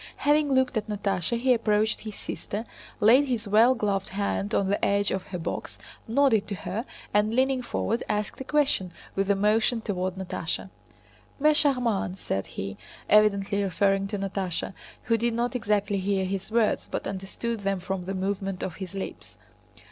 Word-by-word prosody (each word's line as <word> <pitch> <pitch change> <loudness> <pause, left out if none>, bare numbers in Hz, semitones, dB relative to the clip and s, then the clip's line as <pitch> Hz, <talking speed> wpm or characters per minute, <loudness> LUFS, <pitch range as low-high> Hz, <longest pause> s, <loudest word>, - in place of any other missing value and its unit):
Having 290 -1 +2
looked 260 -2 +2
at 215 - -2
Natásha 205 +1 -1
he 255 +1 +4
approached 220 -2 +1
his 215 -2 -7
sister, 215 +3 -5 0.3
laid 255 +7 +6
his 230 -4 -2
well 225 +5 +5
gloved 200 -4 -1
hand 200 +1 -1
on 195 - +2
the 200 +1 0
edge 200 0 +2
of 190 -1 -3
her 180 - -4
box, 165 -1 -5 0.3
nodded 230 -3 +3
to 200 - -3
her, 195 +7 -4 0.3
and 210 +2 +2
leaning 260 0 +2
forward 235 -1 -1
asked 210 +4 -2
a - - -2
question, 275 -10 +1 0.2
with 195 0 0
a 200 - +5
motion 215 +4 +2
toward 185 -4 -2
Natásha. 190 0 -4 0.7
"Mais 305 +1 +5
charmante!" 245 -10 +2
said 95 - -3
he, 95 0 -6 0.3
evidently 205 -1 +4
referring 195 0 +1
to 205 +1 -3
Natásha, 195 -2 -2 0.3
who 230 0 +2
did 235 0 0
not 240 +2 -1
exactly 205 -3 +1
hear 190 0 0
his 195 +2 -4
words 225 -1 +2
but - - -3
understood 200 +4 -4
them 195 -1 -1
from 185 0 -4
the 195 +1 -3
movement 195 0 -2
of 180 - -4
his 190 -1 -7
lips. 195 - -6
205 Hz, 170 wpm, -27 LUFS, 195-230 Hz, 0.7 s, laid